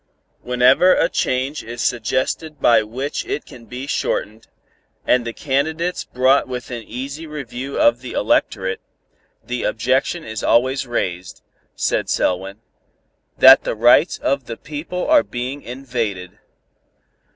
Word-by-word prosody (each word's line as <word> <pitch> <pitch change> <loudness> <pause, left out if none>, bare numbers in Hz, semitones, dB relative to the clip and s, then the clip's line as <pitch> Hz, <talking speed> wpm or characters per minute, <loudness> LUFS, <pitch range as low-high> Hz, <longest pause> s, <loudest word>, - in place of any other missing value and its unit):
"Whenever 125 +9 +4
a - - +3
change 130 +2 -1
is 120 +1 -8
suggested 130 +7 -1
by 120 -4 +5
which 130 +7 -4
it - - -3
can 120 -2 -13
be 125 +3 -7
shortened, 110 -6 -3 0.6
and 125 -2 +2
the - - -2
candidates 155 +7 -2
brought 130 +2 +2
within 125 -1 -6
easy 135 +8 -7
review 140 -2 -6
of 120 +1 +4
the 130 - -7
electorate, 95 -2 0 0.6
the 125 0 -4
objection 130 +8 0
is 110 -1 -6
always 130 +2 +2
raised," 90 -6 -4 0.3
said - - -1
Selwyn, 95 +3 -1 0.8
"that 130 +1 +8
the - - -2
rights 120 +9 +4
of 140 -2 -1
the 115 - -6
people 155 +5 -5
are 305 -1 +6
being 130 - -5
invaded. 115 -8 -5
125 Hz, 130 wpm, -20 LUFS, 115-140 Hz, 0.8 s, that